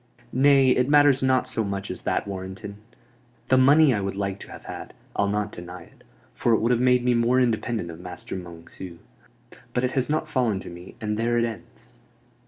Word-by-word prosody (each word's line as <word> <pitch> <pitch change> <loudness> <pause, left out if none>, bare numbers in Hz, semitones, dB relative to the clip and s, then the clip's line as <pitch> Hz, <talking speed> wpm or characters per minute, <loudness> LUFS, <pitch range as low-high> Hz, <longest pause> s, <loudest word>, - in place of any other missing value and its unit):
"Nay, 135 0 +5
it 125 +2 +2
matters 145 -2 +5
not 130 -1 +2
so 110 - -2
much 100 -1 -4
as - - -7
that, - - -1
Warrenton. 95 +1 -7 0.7
The 130 - +5
money 145 +2 +6
I 105 - -1
would 95 0 -3
like 100 0 -3
to - - -11
have - - -11
had, - - -8 0.2
I'll 100 - +1
not 105 +1 -1
deny 90 0 -9
it; - - -22 0.3
for 120 - +1
it - - +5
would 115 +2 +1
have 120 -1 +2
made 125 -1 +3
me 125 - +3
more 120 +2 +3
independent 115 -6 0
of 80 - -11
Master 90 +1 -7
Monceux. 85 0 -9 0.8
But 125 - +1
it 125 - +1
has 130 +1 0
not 155 +1 0
fallen 120 -9 0
to - - -9
me, 85 +1 -11
and 105 -2 -2
there 120 +1 +1
it 115 - +2
ends." 110 -7 -9
115 Hz, 205 wpm, -25 LUFS, 95-130 Hz, 0.8 s, money